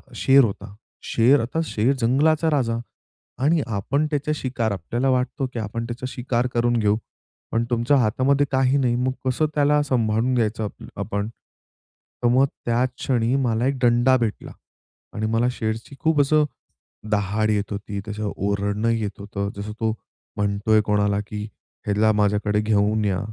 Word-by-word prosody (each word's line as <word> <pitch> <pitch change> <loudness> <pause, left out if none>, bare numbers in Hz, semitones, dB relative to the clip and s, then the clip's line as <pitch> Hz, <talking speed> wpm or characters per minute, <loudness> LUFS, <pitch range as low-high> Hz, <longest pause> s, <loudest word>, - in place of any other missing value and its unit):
शेर 135 0 +5
होता. 100 -1 -4 0.3
शेर 125 +5 +4
आता 130 +8 -2
शेर 120 +3 +1
जंगलाचा 150 +7 +2
राजा. 115 -5 +1 0.7
आणि 155 +1 +3
आपण 140 +10 0
त्याचे 150 +1 0
शिकार. 125 -6 -2
आपल्याला 120 +9 -1
वाटतं, 130 +2 0
की 115 - -3
आपण 115 +2 -4
त्याचे 125 +2 -5
शिकार 125 -1 -1
करून 120 0 +2
घेऊ, 105 0 +2 0.5
पण 115 +1 +1
तुमच्या 120 +4 +2
हातामध्ये 130 +4 +2
काही 130 +1 +3
नाही 125 -3 +1
मग 130 +1 0
कस 130 +3 -1
त्याला 150 -1 +2
असं 145 -3 +1
संभाळून 115 +2 +1
घ्यायचं 110 -1 0
आप 105 - -7 0.2
आपण. 100 +1 -2 1.0
तर - - +4
मग 130 +3 +4 0.2
त्या 120 +1 +2
क्षणी 125 -1 0
मला 115 +1 +1
एक 135 -1 0
दंडा 120 +2 +4
भेटला. 115 -3 -3 0.6
आणि 110 - -2
मला 120 +2 +2
शेरशी 115 +3 -4
खूप 160 -2 +3
असं 150 +2 +3 0.7
दहाड 105 +1 +1
येत 105 0 0
होती. 100 0 -4
त्याच 105 0 -6
ओरडणं 100 +2 -1
येत 110 -4 -2
होत. 100 0 -4
जसं 105 +1 -5
तो 110 -1 +1 0.5
म्हणत 100 +1 -1
आहे 110 0 +6
कोणाला, 105 -1 +2
की 105 -1 -5 0.4
"ह्याला 105 +1 +3
माझ्याकडं 105 0 +1
घेऊन 105 0 +1
या" 95 -2 0
115 Hz, 160 wpm, -23 LUFS, 105-130 Hz, 1.0 s, आहे